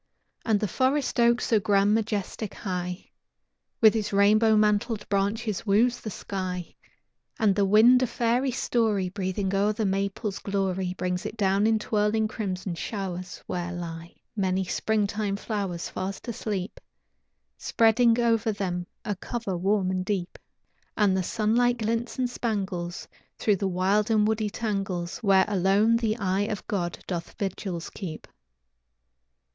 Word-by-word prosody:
And 220 Hz, -3 st, +2 dB
the 210 Hz, -, 0 dB
forest 260 Hz, -, 0 dB
oak, 235 Hz, 0 st, +4 dB
so 225 Hz, -3 st, +2 dB
grand, 200 Hz, +1 st, +3 dB
majestic, 215 Hz, -1 st, -2 dB
high, 180 Hz, -2 st, -5 dB, 0.7 s
With 220 Hz, -2 st, +7 dB
his 220 Hz, -2 st, -2 dB
rainbow 215 Hz, +2 st, +4 dB
mantled 210 Hz, +1 st, +1 dB
branches 205 Hz, +1 st, -1 dB
woos 230 Hz, +4 st, +3 dB
the 220 Hz, -, -6 dB
sky, 185 Hz, -3 st, -5 dB, 0.6 s
And 215 Hz, -4 st, +3 dB
the 200 Hz, 0 st, +2 dB
wind 225 Hz, +6 st, +6 dB
a 255 Hz, -, +2 dB
fairy 240 Hz, +3 st, +1 dB
story 220 Hz, -6 st, 0 dB
Breathing 190 Hz, 0 st, -2 dB
o'er 200 Hz, +2 st, +2 dB
the 215 Hz, 0 st, -1 dB
maple's 195 Hz, +1 st, -2 dB
glory, 190 Hz, -2 st, -1 dB
Brings 180 Hz, -1 st, -2 dB
it 230 Hz, -, -8 dB
down 200 Hz, +1 st, +2 dB
in 225 Hz, 0 st, +3 dB
twirling 215 Hz, 0 st, +1 dB
crimson 190 Hz, -4 st, -4 dB
showers, 185 Hz, 0 st, -5 dB
where 175 Hz, 0 st, -3 dB
lie 170 Hz, -1 st, -7 dB, 0.2 s
Many 190 Hz, -2 st, 0 dB
springtime 205 Hz, +1 st, -1 dB
flowers, 200 Hz, -5 st, -3 dB
fast 190 Hz, +5 st, -5 dB
asleep, 210 Hz, -5 st, -4 dB, 0.8 s
Spreading 230 Hz, +1 st, +3 dB
over 230 Hz, -1 st, +2 dB
them 180 Hz, -3 st, -3 dB, 0.2 s
a 205 Hz, -, -1 dB
cover 215 Hz, 0 st, -4 dB
warm 190 Hz, +1 st, +1 dB
and 185 Hz, -1 st, -1 dB
deep; 185 Hz, -2 st, -3 dB, 0.6 s
And 205 Hz, -3 st, +3 dB
the 190 Hz, -, +1 dB
sunlight 230 Hz, +6 st, +1 dB
glints 230 Hz, +1 st, -2 dB
and 255 Hz, -1 st, +1 dB
spangles 190 Hz, -7 st, -3 dB, 0.3 s
Through 210 Hz, -2 st, +2 dB
the 195 Hz, -, -1 dB
wild 190 Hz, +4 st, +1 dB
and 215 Hz, -1 st, +3 dB
woody 220 Hz, -1 st, 0 dB
tangles, 195 Hz, -5 st, -3 dB
Where 195 Hz, -4 st, +4 dB
alone 205 Hz, +3 st, +3 dB
the 225 Hz, -1 st, 0 dB
eye 195 Hz, -1 st, 0 dB
of 210 Hz, -, -4 dB
God 175 Hz, -4 st, -2 dB
doth 170 Hz, -2 st, -4 dB
vigils 190 Hz, -3 st, -4 dB
keep. 170 Hz, -6 st, -7 dB
205 Hz, 140 wpm, -26 LUFS, 190-220 Hz, 0.8 s, With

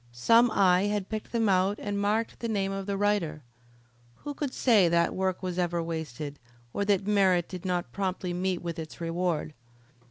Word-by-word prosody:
Some 230 Hz, -, +4 dB
eye 185 Hz, -2 st, +4 dB
had 205 Hz, -2 st, -2 dB
picked 215 Hz, -1 st, -5 dB
them 230 Hz, -2 st, +1 dB
out 190 Hz, +1 st, +2 dB
and 200 Hz, -1 st, -2 dB
marked 215 Hz, +3 st, 0 dB
the 235 Hz, -, -3 dB
name 195 Hz, -3 st, 0 dB
of 195 Hz, 0 st, -4 dB
the 200 Hz, -1 st, -1 dB
writer. 195 Hz, -7 st, 0 dB, 0.8 s
Who 290 Hz, -, -4 dB
could 285 Hz, -2 st, -3 dB
say 215 Hz, -9 st, +4 dB
that 170 Hz, 0 st, +2 dB
work 190 Hz, 0 st, -1 dB
was 185 Hz, -1 st, -2 dB
ever 175 Hz, -1 st, 0 dB
wasted, 155 Hz, -3 st, -5 dB, 0.3 s
or 200 Hz, -, 0 dB
that 200 Hz, -2 st, +2 dB
merit 190 Hz, -4 st, +3 dB
did 185 Hz, 0 st, -8 dB
not 175 Hz, -8 st, -1 dB
promptly 185 Hz, 0 st, -2 dB
meet 180 Hz, 0 st, -1 dB
with 170 Hz, -1 st, -4 dB
its 160 Hz, +1 st, -8 dB
reward? 165 Hz, -2 st, -2 dB
185 Hz, 185 wpm, -28 LUFS, 170-205 Hz, 0.8 s, Some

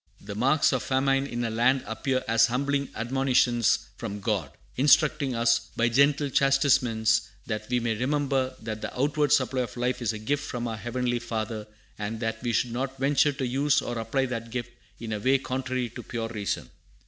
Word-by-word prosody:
"The -, -, -8 dB
marks 135 Hz, +8 st, +3 dB
of 130 Hz, -, 0 dB
famine 135 Hz, +1 st, +1 dB
in 120 Hz, -2 st, -3 dB
a 115 Hz, -, -1 dB
land 125 Hz, +4 st, +2 dB
appear 130 Hz, +4 st, -1 dB
as 115 Hz, 0 st, +5 dB
humbling 140 Hz, +3 st, -1 dB
admonitions 120 Hz, -1 st, +2 dB, 0.2 s
from 105 Hz, -, -5 dB
God, 100 Hz, -, -1 dB, 0.3 s
instructing 145 Hz, -1 st, +3 dB
us 115 Hz, +1 st, +3 dB, 0.2 s
by 115 Hz, +1 st, +3 dB
gentle 140 Hz, +3 st, +3 dB
chastisements, 130 Hz, -5 st, +3 dB, 0.2 s
that 110 Hz, +1 st, -4 dB
we 125 Hz, 0 st, +2 dB
may 115 Hz, -1 st, -1 dB
remember 135 Hz, +1 st, 0 dB
that 110 Hz, -1 st, -5 dB
the -, -, -4 dB
outward 145 Hz, +1 st, +1 dB
supply 130 Hz, 0 st, +2 dB
of 125 Hz, -, -5 dB
life 125 Hz, +1 st, -1 dB
is 115 Hz, -2 st, 0 dB
a 110 Hz, -, -5 dB
gift 145 Hz, +7 st, -1 dB
from 120 Hz, -3 st, -4 dB
our 115 Hz, -, -3 dB
Heavenly 120 Hz, +1 st, -2 dB
Father, 110 Hz, -2 st, -4 dB, 0.3 s
and 110 Hz, +2 st, -4 dB
that 110 Hz, -1 st, -3 dB
we 120 Hz, -, -1 dB
should 120 Hz, +1 st, 0 dB
not 135 Hz, +2 st, -3 dB
venture 140 Hz, +2 st, +3 dB
to 135 Hz, -1 st, -3 dB
use 135 Hz, +3 st, +2 dB
or 120 Hz, -1 st, -4 dB
apply 125 Hz, +4 st, 0 dB
that 115 Hz, -3 st, -5 dB
gift 120 Hz, 0 st, -4 dB, 0.3 s
in 115 Hz, -1 st, -4 dB
a 105 Hz, -, -2 dB
way 130 Hz, +5 st, +3 dB
contrary 130 Hz, -1 st, -2 dB
to -, -, -8 dB
pure 115 Hz, -2 st, -4 dB
reason." 100 Hz, -, -3 dB
125 Hz, 190 wpm, -27 LUFS, 115-135 Hz, 0.3 s, as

